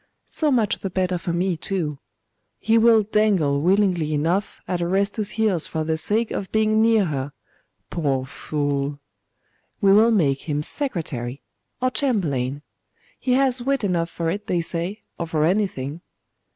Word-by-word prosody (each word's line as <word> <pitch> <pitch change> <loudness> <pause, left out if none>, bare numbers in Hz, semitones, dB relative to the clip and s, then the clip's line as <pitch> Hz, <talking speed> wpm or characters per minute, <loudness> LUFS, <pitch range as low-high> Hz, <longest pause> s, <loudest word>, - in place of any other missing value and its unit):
So 310 - 0
much 230 -5 +1
the 195 - -4
better 185 -1 -1
for 170 - -3
me, 175 +1 0
too. 160 -4 -3 0.6
He 225 - +1
will 225 -1 +6
dangle 195 -10 +2
willingly 180 -4 +2
enough 170 +7 -1
at 180 -1 -1
Orestes's 200 +4 0
heels 205 -7 +2
for 160 -1 -2
the 160 0 0
sake 215 +8 0
of 195 - -4
being 220 0 +3
near 225 -2 +4
her 140 -3 -3 0.6
poor 135 -5 0
fool! 140 0 -2 0.8
We 195 -3 +5
will 220 +3 +6
make 155 -9 +1
him 150 0 0
secretary, 150 - -3 0.4
or 255 0 +1
chamberlain. 145 - 0 0.6
He 255 - 0
has 260 -1 +2
wit 270 -1 0
enough 175 -4 0
for 165 -1 -2
it, 205 +3 -5
they 175 -2 +1
say, 175 +5 -4 0.2
or 170 - -2
for 155 -2 +1
anything. 170 -6 -1
180 Hz, 150 wpm, -23 LUFS, 155-215 Hz, 0.8 s, will